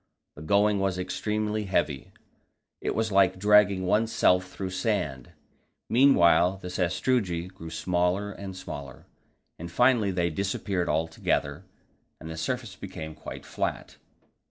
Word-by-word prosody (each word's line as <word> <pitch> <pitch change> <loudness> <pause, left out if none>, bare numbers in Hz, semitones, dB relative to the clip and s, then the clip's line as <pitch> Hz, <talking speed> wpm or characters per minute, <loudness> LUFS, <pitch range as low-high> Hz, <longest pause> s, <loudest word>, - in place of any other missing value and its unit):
The 75 - -12
going 100 +5 +2
was 95 -1 0
extremely 105 +3 -2
heavy; 85 -8 -1 0.7
it - - -2
was 110 -1 0
like 95 -1 +4
dragging 100 -1 +4
oneself 90 -3 +2
through 95 -1 -5
sand. 95 - -2 0.6
Meanwhile 90 -8 +5
the 90 -1 -8
sastrugi 90 0 0
grew 95 -3 -10
smaller 90 +4 0
and 95 -2 -8
smaller, 70 -8 -8 0.5
and 85 +1 -7
finally 120 0 +3
they 85 -2 0
disappeared 95 0 -2
altogether, 80 +2 -1 0.5
and 80 0 -8
the - - -6
surface 115 +5 -3
became 80 -5 -7
quite - - -9
flat. - - -4
95 Hz, 125 wpm, -27 LUFS, 85-105 Hz, 0.7 s, Meanwhile